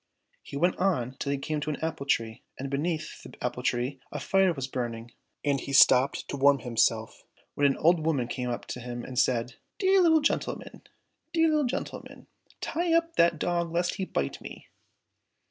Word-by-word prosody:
He 140 - -7
went 175 +5 +2
on 160 -10 0
till 140 - -2
he 140 - 0
came 150 +2 -3
to 150 - -3
an 150 - -1
apple 160 -3 -4
tree, 115 -4 0 0.2
and 135 +1 -5
beneath 155 +3 -2
the - - -12
apple 125 0 -3
tree 125 +2 -1
a 145 - -4
fire 190 +5 +3
was 135 -6 -3
burning, 120 -3 -5 0.3
and 140 -2 +1
he 140 - -6
stopped 130 0 +5
to 140 - -3
warm 140 +1 +5
himself, 115 -2 0 0.3
when 145 - +3
an 135 - 0
old 165 0 +3
woman 145 -7 0
came 125 0 -3
up 120 - -3
and 125 +1 -7
said 120 -2 +2
to - - -16
him, - - -27
" - - -53
Dear 385 -1 +4
little 320 -3 +5
gentleman! 295 - -2 0.5
dear 325 -1 +4
little 305 -2 +2
gentleman! 245 - -5 0.4
tie 340 +1 -1
up 335 0 +1
that 170 -1 +4
dog 170 +1 -1
lest 175 +1 0
he 190 - -2
bite 70 - -3
me." - - -10
140 Hz, 195 wpm, -28 LUFS, 125-175 Hz, 0.5 s, stopped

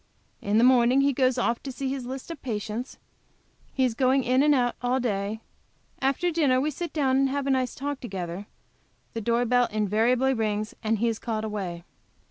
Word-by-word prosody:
In 205 +1 +1
the 230 - +5
morning 250 +1 +5
he 280 0 +3
goes 255 0 +2
off 235 -1 0
to 275 - -6
see 270 +1 -4
his 265 -2 -4
list 265 +5 -6
of 330 - -8
patients; 225 +1 -4 0.7
he 265 - 0
is 245 - 0
going 260 +2 +2
in 255 +2 +3
and 295 0 +4
out 245 -2 +1
all 250 +1 +1
day; 210 -2 -2 0.6
after 275 +7 +1
dinner 290 -6 +2
we 300 +3 0
sit 340 +4 -5
down 270 -2 +2
to - - -3
have 280 0 -2
a 275 - +1
nice 260 -1 0
talk 285 +1 -4
together; 190 -3 -6 0.7
the 230 - -3
door 235 +3 +1
bell 245 0 +3
invariably 225 +5 +2
rings, 215 -2 -2
and 220 0 +1
he 235 +3 +1
is 225 -1 -1
called 220 -2 -3
away. 190 -6 -4
250 Hz, 200 wpm, -26 LUFS, 220-265 Hz, 0.7 s, the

